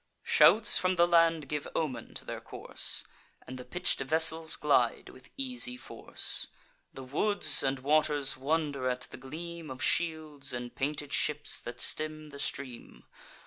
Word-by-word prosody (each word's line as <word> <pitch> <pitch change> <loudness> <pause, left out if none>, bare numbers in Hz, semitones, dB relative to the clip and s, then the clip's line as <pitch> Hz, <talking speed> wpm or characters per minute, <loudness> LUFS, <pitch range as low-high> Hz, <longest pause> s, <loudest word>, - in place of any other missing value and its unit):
Shouts 220 0 +5
from 185 0 0
the 170 -1 +3
land 165 -3 +2
give 150 +1 -4
omen 145 -6 -4
to - - -8
their - - -7
course, - - 0 0.4
And 130 0 -9
the - - -8
pitch'd 175 +8 -2
vessels 160 +3 +4
glide 130 -5 0
with 130 - -17
easy 250 -2 -1
force. - - -1 0.4
The 135 - -10
woods 205 +11 +3
and 135 0 -1
waters 145 +1 +2
wonder 140 -1 -2
at 125 0 -3
the - - -12
gleam 160 +5 -9
Of 130 0 -6
shields, 155 -5 -1
and 120 0 -6
painted 145 +1 -4
ships 150 -1 0
that 120 - -9
stem 155 -1 -2
the 140 - -11
stream. 130 -4 -6
150 Hz, 150 wpm, -29 LUFS, 135-165 Hz, 0.4 s, Shouts